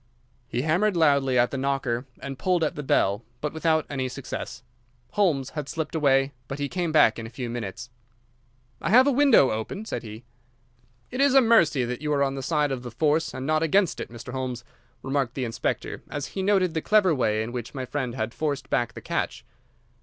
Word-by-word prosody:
He 120 +1 -2
hammered 180 +5 +2
loudly 140 -5 +3
at 120 0 +3
the 135 - -3
knocker 135 -2 -1
and 135 -1 -6
pulled 180 -3 +1
at 155 - 0
the 150 - -5
bell, 105 -6 +1 0.2
but 150 +2 -3
without 160 -1 +1
any 130 -2 -2
success. 130 -1 -6 0.5
Holmes 155 -10 +1
had 150 -2 -5
slipped 160 -2 -4
away, 135 -3 +3 0.2
but 135 - -5
he 145 0 -2
came 175 +1 -2
back 120 -8 +5
in 115 - -6
a - - -10
few 120 0 -5
minutes. 115 0 -6 0.9
"I - - -1
have 250 +6 +7
a 285 - +3
window 270 - +5
open," 110 - -4
said - - -4
he. 110 0 -9 0.9
"It 250 +2 -1
is 280 -1 +4
a - - +10
mercy 170 - +4
that 125 +2 -4
you 150 0 -2
are 140 -1 +2
on 135 -1 0
the 135 - -4
side 145 +1 +1
of 130 -2 -3
the 120 - -7
force, 150 +6 +1
and 130 - -6
not 155 +1 +2
against 175 +2 +2
it, - - -5
Mr. 120 +2 -9
Holmes," 130 -2 -4 0.4
remarked 135 -2 -1
the 130 - -2
inspector, 115 - -3
as 145 -1 -4
he 195 - -2
noted 190 -3 +2
the 160 - -1
clever 205 -3 +4
way 110 -5 +1
in 115 - -6
which 120 +2 -6
my 130 -1 -3
friend 130 -2 -3
had 110 -1 -3
forced 145 -3 -3
back 120 -1 +1
the - - -9
catch. - - -3
140 Hz, 215 wpm, -25 LUFS, 125-160 Hz, 0.9 s, a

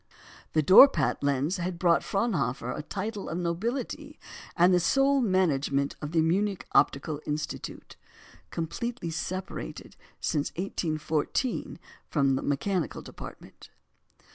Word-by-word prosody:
The 155 - +3
Dorpat 260 - +7
lens 145 +6 0
had 180 0 -3
brought 170 -1 +3
to - - -12
Fraunhofer 180 - -1
a - - -4
title 205 +6 -5
of 165 - -3
nobility 235 - -3 0.4
and 180 +2 +5
the 180 - +5
sole 275 +9 +3
management 150 - +1
of 150 0 -5
the 165 -1 +3
Munich 195 +4 0
Optical 145 +2 +2
Institute 150 +1 -5 0.5
(completely 170 +3 -4
separated 175 - -5 0.2
since 145 -1 -1
1814 160 - -2 0.3
from 140 -3 +2
the 130 - 0
mechanical 160 +5 -1
department). - - -11
170 Hz, 115 wpm, -28 LUFS, 150-200 Hz, 0.5 s, Dorpat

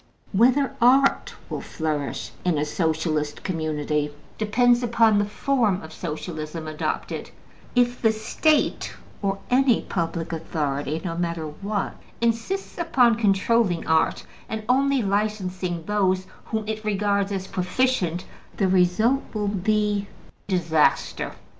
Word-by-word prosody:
Whether 255 +7 +3
art 270 +3 +4
will - - -4
flourish 155 -3 -3
in 175 -4 +1
a 150 - +1
Socialistic 155 -2 -1
community 150 -3 -1 0.3
depends 240 +3 +3
upon 230 -3 +4
the 205 - +2
form 215 -2 +1
of 160 0 -10
Social 160 0 -5
ism 155 +1 -5
adopted; 155 0 -3 0.5
if 245 0 +2
the 225 - +4
State, 240 +8 +1 0.3
or 195 -1 0
any 255 -2 +4
public 165 -1 -3
authority, 150 -2 -2
(no 165 -2 -2
matter 170 -2 -2
what), 200 +7 -3 0.2
insists 235 - -1
upon 260 -8 +4
controlling 210 -3 +2
art, 160 0 +2 0.2
and 220 -1 -4
only 270 0 +3
licensing 190 -4 -1
those 190 -2 +1 0.2
whom 220 -1 -3
it 215 0 -3
regards 200 -1 +1
as 190 -1 -2
proficient, 185 -2 0 0.3
the 195 - +2
result 190 +8 +3
will 210 -1 0
be 205 +1 0 0.4
disaster. 165 -5 +1
200 Hz, 120 wpm, -24 LUFS, 165-230 Hz, 0.5 s, art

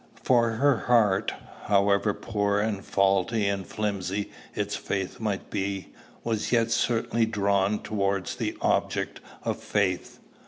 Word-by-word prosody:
For 115 -2 +3
her 135 +2 +3
heart, 110 -6 +3 0.3
however 100 0 +3
poor 105 -2 0
and 105 -2 -1
faulty 100 +3 +2
and 100 -2 -2
flimsy 100 -1 -2 0.2
its - - -1
faith 95 -2 -3
might 105 -3 -3
be, 95 0 -3 0.3
was 110 -2 -1
yet 115 -1 +3
certainly 115 -1 +1
drawn 100 -1 +1
towards 100 -2 -1
the - - -2
object - - 0 0.2
of - - -2
faith. 95 -3 -1
100 Hz, 125 wpm, -27 LUFS, 100-115 Hz, 0.3 s, For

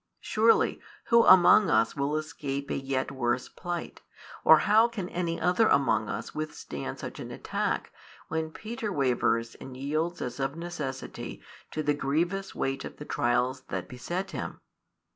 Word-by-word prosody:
Surely, 450 0 +3 0.3
who 235 -2 +7
among 185 +1 +8
us - - +3
will 145 +1 0
escape 140 -2 -4
a - - 0
yet 135 -1 -2
worse 125 -2 -1
plight, 175 -2 -6 0.4
or 160 - +9
how 220 +3 +6
can 215 -6 -5
any 170 -1 -2
other 180 +7 +3
among 135 -6 +2
us - - -5
withstand 150 - -5
such - - -7
an - - -6
attack, - - -2 0.3
when 160 0 -2
Peter 220 +4 -5
wavers 125 -6 +1
and 130 -1 -8
yields 155 +6 -1
as 125 +1 -5
of 135 +2 -1
necessity 155 -6 -5 0.3
to 155 - -3
the 150 - +2
grievous 170 +8 -1
weight 135 0 -2
of - - -8
the 150 - -8
trials 125 +1 0
that - - -3
beset 175 +10 -4
him? - - -5
155 Hz, 155 wpm, -28 LUFS, 135-180 Hz, 0.4 s, or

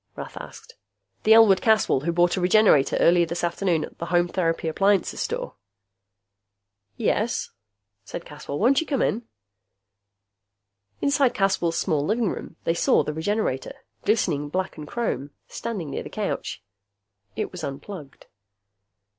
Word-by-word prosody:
Rath - - -8
asked. - - -10 0.5
"The 220 +1 +7
Elwood 215 -4 +6
Caswell 220 - +3
who 160 +5 -1
bought 175 +1 +3
a 185 - -2
Regenerator 180 -6 +4
early 175 0 +5
this 170 +1 -3
afternoon 175 -1 0
at - - -17
the 170 - -4
Home 175 0 +2
Therapy 165 -2 -1
Appliances 195 +4 +1
Store?" - - -3 1.4
"Yes," - - 0 0.5
said 95 - -7
Caswell. 140 - -7
"Won't 260 - +3
you 325 - -6
come 275 -5 +1
in?" 225 +2 -1 1.7
Inside 280 -3 +2
Caswell's 185 -4 +1
small 150 -2 0
living 215 +4 +1
room, - - -7
they 165 - +1
saw 170 - +3
the 150 - -3
Regenerator, 160 - -2 0.3
glistening 155 -9 +1
black 185 +4 -2
and 150 -2 -9
chrome, 225 - -2 0.2
standing 185 -11 -5
near - - -3
the - - -8
couch. - - -4 0.7
It - - -3
was - - -8
unplugged. 140 +1 -8
180 Hz, 140 wpm, -24 LUFS, 160-215 Hz, 1.7 s, The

